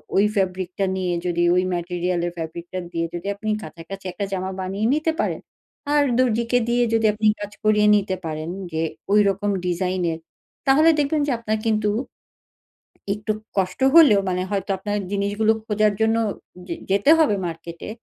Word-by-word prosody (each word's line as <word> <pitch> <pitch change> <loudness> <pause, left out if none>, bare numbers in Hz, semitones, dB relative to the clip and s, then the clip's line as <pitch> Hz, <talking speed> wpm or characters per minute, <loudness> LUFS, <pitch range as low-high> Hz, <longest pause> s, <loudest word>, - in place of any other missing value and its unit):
ওই 200 - +5
ফ্যাব্রিকটা 190 0 -1
নিয়ে 185 -2 -1
যদি 175 -1 +1
ওই 180 - +3
ম্যাটেরিয়ালের 175 0 -1
ফ্যাব্রিকটা 170 +3 -5
দিয়ে 165 -1 -1
যদি 175 +3 -5
আপনি 215 +2 -5
কাছাকাছি 180 +5 -9
একটা 200 +3 -3
জামা 190 0 -2
বানিয়ে 195 +3 -2
নিতে 310 +2 +1
পারেন। - - -1 0.5
আর 295 -1 +5 0.2
দর্জিকে 235 0 +2
দিয়ে 240 0 +3
যদি 225 -1 +2
আপনি 215 0 +1
কাজ 205 0 -6
করিয়ে 210 -1 +4
নিতে 195 -2 0
পারেন 155 +1 -4 0.2
যে 160 - -1 0.3
ওইরকম 205 -1 +3 0.2
ডিজাইনের। 180 -2 -1 0.5
তাহলে 305 +5 +6
দেখবেন 295 +1 +1
যে - - +1
আপনার 220 -1 -1
কিন্তু 215 -1 +1 1.2
একটু 210 +1 -3 0.3
কষ্ট 185 +2 0 0.2
হলেও 285 -12 +8
মানে 180 0 -1
হয়তো 195 0 -2
আপনার 205 +2 -3
জিনিসগুলো 205 +2 +1
খোঁজার 210 -1 +2
জন্য 220 0 +3 0.5
যে 170 - -3
যেতে 200 +9 +2
হবে 300 -10 +4
মার্কেটে। 170 +3 -8
200 Hz, 155 wpm, -22 LUFS, 180-215 Hz, 1.2 s, হলেও